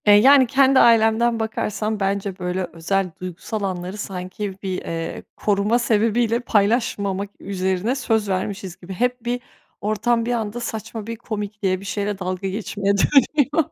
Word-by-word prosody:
Eee, 205 Hz, -, +9 dB
yani 265 Hz, +4 st, +7 dB
kendi 270 Hz, 0 st, +5 dB
ailemden 230 Hz, 0 st, +4 dB
bakarsam 215 Hz, -1 st, -2 dB
bence 195 Hz, -1 st, -1 dB
böyle 180 Hz, +1 st, -2 dB
özel, 185 Hz, +3 st, -1 dB
duygusal 185 Hz, +4 st, -5 dB
anları 185 Hz, 0 st, -3 dB
sanki 190 Hz, 0 st, -5 dB
bir, 185 Hz, -1 st, -2 dB
eee, 165 Hz, 0 st, -5 dB
koruma 210 Hz, +3 st, +1 dB
sebebiyle 230 Hz, 0 st, +2 dB
paylaşmamak 205 Hz, -3 st, +1 dB
üzerine 190 Hz, +4 st, -1 dB
söz 225 Hz, -5 st, 0 dB
vermişiz 190 Hz, -1 st, -3 dB
gibi. 185 Hz, +2 st, -9 dB
Hep 245 Hz, +3 st, -1 dB
bir 245 Hz, +1 st, -1 dB, 0.4 s
ortam 230 Hz, +3 st, +1 dB
bir 245 Hz, -, -1 dB
anda 225 Hz, 0 st, -2 dB
saçma 220 Hz, -2 st, -5 dB
bir 230 Hz, -, -4 dB
komikliye, 205 Hz, -4 st, -3 dB
bir 195 Hz, -, -11 dB
şeyle 200 Hz, 0 st, -2 dB
dalga 185 Hz, +1 st, -3 dB
geçmeye 200 Hz, 0 st, -1 dB
dönüyor. 290 Hz, +6 st, +3 dB
210 Hz, 145 wpm, -22 LUFS, 190-230 Hz, 0.4 s, Eee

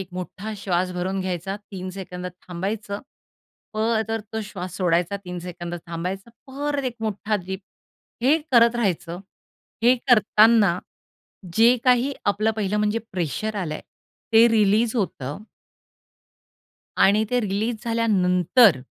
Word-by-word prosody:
एक 190 Hz, -, -6 dB
मोठा 185 Hz, +4 st, -6 dB
श्वास 185 Hz, -2 st, -1 dB
भरून 190 Hz, +2 st, -2 dB
घ्यायचा, 185 Hz, +1 st, -3 dB
3 190 Hz, -3 st, -8 dB
सेकंद 180 Hz, -1 st, -6 dB, 0.2 s
थांबायचं, 200 Hz, +3 st, -4 dB, 0.7 s
परत 220 Hz, 0 st, 0 dB
तो 220 Hz, -, -2 dB
श्वास 185 Hz, -3 st, -7 dB
सोडायचा, 180 Hz, +1 st, +1 dB
3 180 Hz, 0 st, -5 dB
सेकंद 175 Hz, 0 st, -6 dB
थांबायचा, 180 Hz, +6 st, -5 dB, 0.2 s
परत 285 Hz, +1 st, -3 dB
एक 245 Hz, -2 st, -3 dB
मोठा 215 Hz, 0 st, -1 dB
डीप 190 Hz, +1 st, -4 dB, 0.6 s
हे 275 Hz, +5 st, +5 dB, 0.2 s
करत 235 Hz, 0 st, +6 dB
राहायचं. 175 Hz, -6 st, -1 dB, 0.6 s
हे 245 Hz, +2 st, +6 dB
करताना 215 Hz, -4 st, +5 dB, 0.8 s
जे 230 Hz, +3 st, +6 dB
काही 255 Hz, +2 st, +3 dB
आपलं 210 Hz, +2 st, +2 dB
पहिलं 210 Hz, -1 st, -1 dB
म्हणजे 210 Hz, +2 st, +1 dB
प्रेशर 190 Hz, +5 st, -2 dB
आलंय 160 Hz, -6 st, -3 dB, 0.5 s
ते 225 Hz, +1 st, +8 dB
रिलीज 220 Hz, +2 st, +3 dB
होतं. 180 Hz, -, -3 dB, 1.5 s
आणि 210 Hz, +3 st, +5 dB
ते 250 Hz, -, +2 dB
रिलीज 210 Hz, +3 st, -1 dB
झाल्यानंतर, 205 Hz, -, +4 dB
205 Hz, 120 wpm, -23 LUFS, 180-225 Hz, 1.5 s, ते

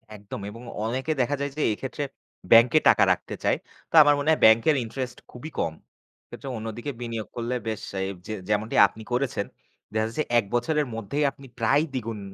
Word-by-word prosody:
একদম 100 Hz, 0 st, -8 dB
এবং 115 Hz, +3 st, -10 dB, 0.2 s
অনেকে 130 Hz, +7 st, -2 dB
দেখা 145 Hz, +4 st, +1 dB
যায় 140 Hz, -1 st, -2 dB
যে -, -, -1 dB
এক্ষেত্রে 135 Hz, +5 st, -5 dB, 0.5 s
ব্যাংকে 120 Hz, +7 st, +7 dB
টাকা -, -, +6 dB
রাখতে -, -, -2 dB
চায়। -, -, +2 dB, 0.3 s
তো -, -, -27 dB
আমার 145 Hz, 0 st, +5 dB
মনে 145 Hz, +2 st, 0 dB
হয় 155 Hz, -, +2 dB
ব্যাংকের 115 Hz, +7 st, +6 dB
ইন্টারেস্ট 125 Hz, +2 st, -5 dB
খুবই 125 Hz, +6 st, -8 dB
কম। 80 Hz, -, 0 dB, 0.5 s
এক্ষেত্রে 135 Hz, -, -9 dB
অন্যদিকে 115 Hz, +5 st, -5 dB
বিনিয়োগ 115 Hz, -2 st, -4 dB
করলে 120 Hz, +1 st, -2 dB
বেশ 110 Hz, -2 st, -3 dB, 0.2 s
এ -, -, 0 dB, 0.2 s
যে 110 Hz, -, -3 dB, 0.2 s
যেমনটি 105 Hz, +1 st, 0 dB
আপনি 110 Hz, +3 st, -12 dB
করেছেন 125 Hz, 0 st, 0 dB, 0.5 s
দেখা 110 Hz, 0 st, +1 dB
যাচ্ছে 150 Hz, +7 st, -2 dB, 0.2 s
১ 105 Hz, -, -3 dB
বছরের 150 Hz, +4 st, +1 dB
মধ্যেই 115 Hz, +7 st, -2 dB
আপনি 140 Hz, -, -15 dB
প্রায় 140 Hz, +7 st, +3 dB
২ 130 Hz, -, 0 dB
গুন। 110 Hz, -2 st, -4 dB
120 Hz, 185 wpm, -25 LUFS, 110-140 Hz, 0.5 s, ব্যাংকে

